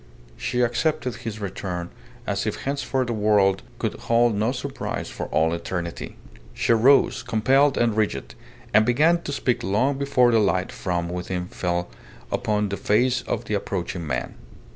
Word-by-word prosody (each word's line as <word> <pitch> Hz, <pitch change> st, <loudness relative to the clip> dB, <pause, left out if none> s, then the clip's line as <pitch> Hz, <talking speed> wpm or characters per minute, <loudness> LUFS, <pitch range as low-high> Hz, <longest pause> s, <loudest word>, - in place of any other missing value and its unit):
She 125 Hz, -, -1 dB
accepted 125 Hz, +1 st, 0 dB
his 110 Hz, -1 st, -6 dB
return 90 Hz, -3 st, -4 dB, 0.3 s
as -, -, -1 dB
if -, -, -3 dB
henceforth 135 Hz, -1 st, -1 dB
the 120 Hz, -, -2 dB
world 105 Hz, -3 st, +3 dB, 0.2 s
could -, -, -2 dB
hold 120 Hz, 0 st, +2 dB
no 105 Hz, +4 st, +1 dB
surprise 135 Hz, +1 st, -4 dB
for -, -, -5 dB
all 80 Hz, +1 st, +2 dB
eternity. 85 Hz, 0 st, -4 dB, 0.4 s
She -, -, +2 dB
rose, 130 Hz, +5 st, +4 dB
compelled 135 Hz, +6 st, +3 dB
and 115 Hz, -3 st, +2 dB
rigid, 70 Hz, -, -1 dB, 0.4 s
and 110 Hz, +1 st, +6 dB
began 155 Hz, +9 st, +3 dB
to 145 Hz, -, -5 dB
speak 125 Hz, -3 st, 0 dB
long 130 Hz, +8 st, +1 dB
before 125 Hz, -3 st, +3 dB
the 115 Hz, -, +4 dB
light 95 Hz, -3 st, +1 dB
from 85 Hz, -2 st, -2 dB
within 90 Hz, +1 st, -3 dB
fell 90 Hz, -1 st, -2 dB, 0.4 s
upon 105 Hz, -1 st, 0 dB
the 100 Hz, -, -3 dB
face 120 Hz, +4 st, +2 dB
of -, -, -2 dB
the -, -, -3 dB
approaching 90 Hz, -4 st, -3 dB
man. 65 Hz, -2 st, -2 dB
110 Hz, 160 wpm, -24 LUFS, 90-125 Hz, 0.4 s, and